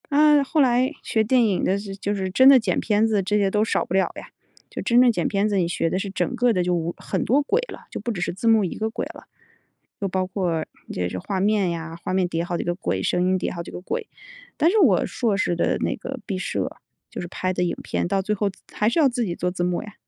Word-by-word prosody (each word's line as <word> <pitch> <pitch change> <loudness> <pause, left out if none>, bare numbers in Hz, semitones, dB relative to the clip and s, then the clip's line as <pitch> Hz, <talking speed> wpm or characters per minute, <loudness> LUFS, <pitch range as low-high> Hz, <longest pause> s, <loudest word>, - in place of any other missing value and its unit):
啊， 295 -1 +5
后 300 +3 +1
来 255 +1 +3
学 220 - +1
电 245 +2 +3
影 200 -4 0
的 195 - +2
是 200 -1 -6
就 200 +1 -2
是 190 -2 -2
真 260 +8 +6
的 270 -2 +8
剪 195 -6 0
片 215 +1 +2
子 215 -3 +1
这 210 +3 +1
些 200 -2 +2
都 210 +2 +1
少 225 - 0
不 - - -6
了 190 0 +2
呀， - - -9 0.4
就 - - -6
真 240 +1 +4
正 250 -1 +6
剪 - - -1
片 200 +1 +1
子 205 -2 0
你 175 -3 +2
学 165 -1 -1
的 185 - -1
是 195 - -4
整 245 +6 -2
个 245 0 +3
的 180 -3 +1
就 180 0 0
无 170 0 -1
很 - - -2
多 275 +5 +3
轨 435 +12 +1
了， - - -11
就 - - -5
不 240 - -3
只 200 - -4
是 - - -1
字 195 +6 -3
幕 220 -3 +5
一 175 - -4
个 220 0 -2
轨 225 - -4
了， - - -13 0.7
又 200 - -1
包 185 0 -1
括 180 -4 -2 0.3
这 - - -4
是 90 - 0
这 90 - -5
画 190 - -3
面 200 -1 +2
呀， 165 -1 -5
画 - - -2
面 185 -1 +2
叠 165 -1 -2
好 175 0 -2
几 - - -2
个 175 - -1
轨， 180 - -2
声 180 - +1
音 185 +1 +2
叠 180 - -2
好 170 - -5
几 - - -9
个 - - -7
轨。 455 - -4 0.5
但 325 - +4
是 440 - +3
我 225 - +4
硕 225 -5 -1
士 175 -3 0
的 170 - +1
那 - - -1
个 265 0 -7
毕 195 - -3
设， 185 - -2 0.4
就 - - -5
是 175 - -5
拍 185 +1 -2
的 180 - 0
影 175 - -1
片， 85 0 -2
到 195 - +1
最 210 +2 -1
后 205 0 0
自 190 - -14
还 210 - +2
是 245 - 0
要 300 - +6
自 245 -2 -1
己 175 -4 -3
做 180 +1 -1
字 175 -1 -3
幕 175 0 0
呀。 210 - -11
195 Hz, 310 characters per minute, -23 LUFS, 180-235 Hz, 0.7 s, 的